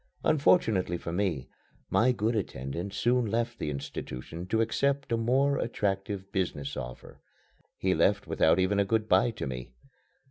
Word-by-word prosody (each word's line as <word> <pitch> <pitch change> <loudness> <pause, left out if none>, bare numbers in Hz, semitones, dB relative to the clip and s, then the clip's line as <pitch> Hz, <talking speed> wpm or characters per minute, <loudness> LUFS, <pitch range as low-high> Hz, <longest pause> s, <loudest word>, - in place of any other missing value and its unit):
Unfortunately 115 - +3
for 85 - -6
me, 85 -9 -1 0.4
my 125 +3 +4
good 115 -1 0
attendant 85 - -3
soon 120 +4 +2
left 115 +2 -1
the - - -2
institution 70 +3 -6
to 110 +3 +1
accept 140 +4 0
a - - +3
more 135 +5 +2
attractive 100 -2 -2
business 75 -8 -2
offer. - - -8 0.6
He - - +1
left - - +2
without 80 - +3
even 95 +2 +2
a - - +5
good 110 +2 0
bye 95 +5 +4
to 115 - -5
me. 65 -2 -6
100 Hz, 150 wpm, -29 LUFS, 85-115 Hz, 0.6 s, a